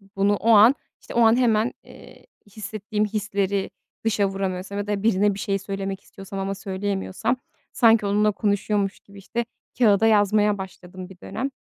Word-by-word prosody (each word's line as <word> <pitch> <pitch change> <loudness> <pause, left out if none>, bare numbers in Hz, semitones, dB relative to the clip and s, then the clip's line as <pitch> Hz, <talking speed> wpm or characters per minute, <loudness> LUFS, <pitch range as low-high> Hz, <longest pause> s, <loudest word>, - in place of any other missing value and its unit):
Bunu 200 +1 +2
o 215 +3 -1
an, 225 +5 +7 0.3
işte, - - -10
o 235 - +2
an, 225 0 +6
hemen, 230 -2 +2
eee, - - -16 0.3
hissettiğim 215 0 -3
hisleri 200 -2 -1 0.4
dışa 210 -3 +2
vuramıyorsam 195 0 -4
ya 205 0 -3
da 205 -1 -2
birine 205 -2 +3
bir 195 - -8
şey 195 -1 -1
söylemek 195 0 -5
istiyorsam 195 0 -9
ama 195 +1 -2
söyleyemiyorsam 195 +3 -2 0.4
sanki 225 -3 +4
onunla 210 +1 +2
konuşuyormuş 205 -1 -1
gibi, 200 0 -17
işte, 235 +5 -3 0.3
kâğıda 220 -3 +4
yazmaya 210 -1 +3
başladım 185 -1 -9
bir 190 - -14
dönem. 265 +7 -4
205 Hz, 160 wpm, -23 LUFS, 195-215 Hz, 0.4 s, an